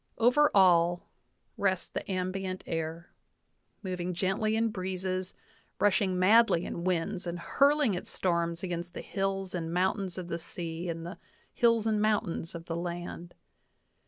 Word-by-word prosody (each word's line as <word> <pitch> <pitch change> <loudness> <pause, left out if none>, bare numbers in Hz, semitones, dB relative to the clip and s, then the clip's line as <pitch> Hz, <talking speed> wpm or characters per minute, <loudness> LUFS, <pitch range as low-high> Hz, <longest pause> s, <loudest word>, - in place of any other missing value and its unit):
Over 250 +6 +5
all 175 -2 +5 0.5
rests 190 -2 +1
the 205 - -5
ambient 185 0 -3
air, 165 +1 -4 0.7
moving 180 -2 -3
gently 195 +4 0
in 225 0 +2
breezes, 185 -1 -3 0.4
rushing 195 -2 +2
madly 195 -1 +5
in 170 - -5
winds, 180 +1 -1
and 170 0 -3
hurling 280 - +3
its 180 - -4
storms 170 -1 0
against 175 -1 -4
the - - -4
hills 195 -1 -2
and 165 -2 -3
mountains 185 +1 0
of 180 -2 -5
the 170 -1 -3
sea 170 +1 -5
and 165 0 -4
the 175 - -8 0.3
hills 230 -3 +3
and 215 -1 +1
mountains 195 -6 0
of 165 0 -7
the 165 - -3
land. 175 0 -5
185 Hz, 145 wpm, -30 LUFS, 170-200 Hz, 0.7 s, Over